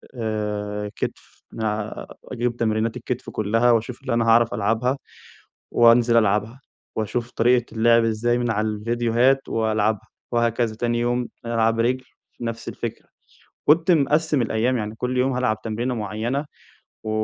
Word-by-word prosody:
آآ 105 -2 -3
كتف، - - -6
نلع 110 -1 -3 0.2
أجيب 120 0 -2
تمرينات 110 +1 0
الكتف 125 +1 -4
كلها 115 +3 +2
واشوف 115 +2 0
اللي 130 -3 -2
أنا 115 -1 +2
هاعرف 115 +1 +4
ألعبها 115 +6 0 0.8
وانزل 120 0 +5
ألعبها، 110 +3 +1 0.4
واشوف 115 +2 -2
طريقة 120 +1 +3
اللعب 115 +1 +4
ازاي 115 +2 +1
من 120 -1 0
على 110 0 0
الفيديوهات 120 +4 +1
وألعبها، 110 -2 0 0.2
وهكذا 120 -1 +1
تاني 120 0 0
يوم 120 0 0 0.2
ألعب 115 -1 +1
رِجل 125 +2 +1 0.4
نفس 115 -1 -4
الفكرة. - - -6 0.6
كنت 165 +4 +4
مقسّم 150 -1 +2
الأيام 120 +3 +1
يعني 105 -1 -4
كل 125 +1 -2
يوم 130 +2 +2
هالعب 110 -4 0
تمرينة 120 +3 -2
معينة 115 +6 -2 0.6
و 110 - -3
115 Hz, 135 wpm, -23 LUFS, 110-125 Hz, 0.8 s, وانزل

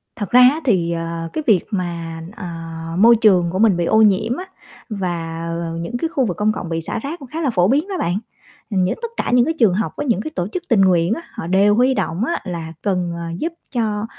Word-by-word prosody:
Thật 205 -4 -5
ra 250 - +7
á 270 +6 +6
thì, 175 -8 +2
ờ, 165 0 -4
cái 310 - -2
việc 200 -7 +4
mà, 170 -4 -4
ờ, 210 - -7 0.5
môi 230 +4 +7
trường 185 -6 +4
của 185 - -2
mình 210 -5 +4
bị 170 - 0
ô 220 +4 +4
nhiễm 210 +3 +3
á 365 - -5 0.4
và, 170 -5 -3 0.2
ờ, 165 -1 -4
những 170 +9 -4
cái 325 +6 -2
khu 270 -6 0
vực 180 - -3
công 210 +1 +2
cộng 180 - -5
bị 165 -1 -2
xả 225 - -4
rác 295 +8 -6
cũng 275 - -10
khá 325 +2 -3
là 285 - +1
phổ 180 -5 +2
biến 290 - +2
đó 395 - -4
bạn. 175 +2 0 0.5
Ừm, 190 -3 +1
những 180 - 0
tất 470 - -4
cả - - -1
những 245 -1 +5
cái 325 - 0
trường 220 -7 +5
học 215 +4 -1
với - - -2
những 230 -7 +1
cái 310 - -6
tổ 175 - -1
chức 355 - -5
tình 225 -5 +4
nguyện 180 0 +3
á 330 - -4
họ - - -6
đều 200 +3 +4
huy 250 +3 +3
động 185 -3 -1
á - - -2
là 170 -4 -5
cần, 180 -4 -1
ờ, 170 - -6 0.2
giúp 330 +1 -2 0.2
cho, 215 -4 -1
200 Hz, 260 wpm, -20 LUFS, 170-240 Hz, 0.5 s, ra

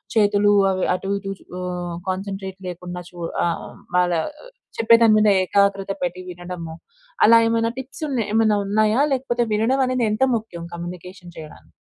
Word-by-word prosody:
చేతులు 205 -1 +4 0.2
అవి 185 0 -1
అటు 195 +1 -5
ఇటు 195 0 -5
చు - - -21 0.2
ఆహ్, 180 -1 -4
కాన్సంట్రేట్ 190 0 -5
లేకుండా 180 0 -7
చూడ 175 -2 -5 0.2
ఆహ్, 170 -1 -3 0.3
వాళ్ళ 180 0 +3 0.7
చెప్పేదాని 230 0 +5
మీద 215 0 +4
ఏకాగ్రత 195 +1 +1
పెట్టి 180 +1 -3
వినడము. 175 -2 -7 0.5
అలా 230 0 +8
ఏమైనా 230 0 +1
టిప్స్ 265 +4 -8
ఉన్న 265 -4 -2
ఏమన్నా 220 -1 +3
ఉన్నాయా? 215 +4 +2
లేకపోతే 245 -2 0
వినడం 240 +6 +2
అనేది 255 -2 0
ఎంత 215 +4 +1
ముఖ్యం, 210 -7 -6
కమ్యూనికేషన్ 175 +1 -8
చేయడానికి? 155 -1 -12
195 Hz, 145 wpm, -22 LUFS, 180-225 Hz, 0.7 s, అలా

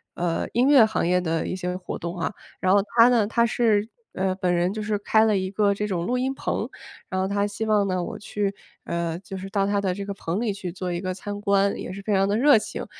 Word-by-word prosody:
呃， 170 -1 -1
音 245 +3 +3
乐 280 -5 +7
行 215 - -1
业 180 +1 +2
的 165 -2 -1
一 - - -3
些 180 -1 -3
活 180 - -6
动 170 +1 -5
啊， 170 - -2 0.3
然 185 0 +3
后 200 - +6 0.2
他 230 +1 +9
呢， 235 -4 +3
他 235 +2 +2
是， 220 -2 +2 0.3
呃， 190 0 0
本 180 -2 0
人 175 +2 +1
就 215 - -4
是 210 0 0
开 220 +2 +3
了 215 -3 +3
一 185 0 -2
个 205 0 +2
这 210 +1 -3
种 175 -3 -2
录 250 - 0
音 260 +2 0
棚， - - -2 0.4
然 185 - -2
后 190 - 0
他 200 +1 0
希 210 +2 -4
望 210 -2 +2
呢， 185 -1 -1
我 - - -5
去， 205 -1 -2 0.3
呃， 170 -1 -2
就 195 0 -8
是 190 +1 -7
到 195 0 +1
他 200 0 +1
的 190 -2 0
这 200 +2 -5
个 200 - -4
棚 190 +1 -3
里 235 -3 0
去 195 -3 -6
做 180 0 -4
一 175 - -2
个 185 0 -3
参 205 +2 -6
观， 200 -1 +2
也 - - -6
是 200 - -7
非 210 +1 -1
常 195 0 +3
得 200 - +1
热 285 +1 +6
情， 215 - -4
200 Hz, 285 characters per minute, -24 LUFS, 185-210 Hz, 0.4 s, 他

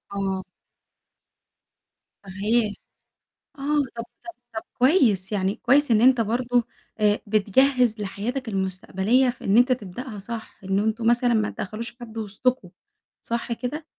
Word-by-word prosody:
آه. 190 -1 -2 1.8
صحيح. 210 +3 0 0.8
آه، - - -10 0.3
طَب 230 - -4 0.2
طَب 345 - -7 0.2
طَب 220 - -2 0.2
كويس. 245 - +3
يعني 195 0 0
كويس 285 -1 +3
إن 215 - +4
أنت 250 -1 +5
برضه 240 +2 +1 0.4
آآ، 210 0 +3
بتجهّز 230 +3 +3
لحياتك 225 +6 -4
المستقبلية 195 +6 +1
في 245 - -7
إن 200 +2 +3
أنت 250 +2 +5
تبدأها 225 0 -4
صح، 225 +2 -8
إن 195 +1 0
أنتم 220 +2 0
مثلًا 240 0 +3
ما 215 -1 +1
تدخّلوش 230 +4 -5
حد 230 -2 -10
وسطكم، 215 -1 -1 0.5
صح 235 0 -3
كده؟ 255 +7 -5
225 Hz, 130 wpm, -24 LUFS, 200-245 Hz, 1.8 s, أنت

